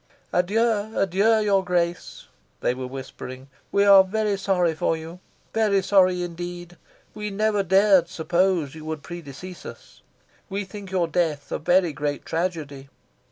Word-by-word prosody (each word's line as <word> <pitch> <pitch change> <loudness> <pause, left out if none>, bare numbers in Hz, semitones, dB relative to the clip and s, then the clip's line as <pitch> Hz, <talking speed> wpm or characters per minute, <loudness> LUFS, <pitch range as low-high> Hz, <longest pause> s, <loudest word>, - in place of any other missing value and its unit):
"Adieu, 215 +3 +1
adieu, 200 +4 +3
your 200 -2 +2
Grace," 175 -1 -2 0.4
they - - +1
were 130 0 -5
whispering. 130 0 -8 0.2
"We 200 0 +3
are 195 -1 +8
very 210 +1 -1
sorry 185 -4 +1
for 160 +1 0
you 165 +2 -9 0.3
very 210 -3 +2
sorry 185 -2 +3
indeed. 175 0 -7 0.4
We 210 0 -5
never 210 0 +1
dared 190 -1 +4
suppose 175 -3 0
you 155 -1 -10
would 155 -2 -5
predecease 175 +1 -9
us. - - -12 0.5
We 200 +1 -3
think 195 0 -9
your 180 -3 0
death 160 -4 -1
a - - -2
very 175 0 +2
great 145 0 -3
tragedy. 155 -6 -3
180 Hz, 145 wpm, -24 LUFS, 160-200 Hz, 0.5 s, are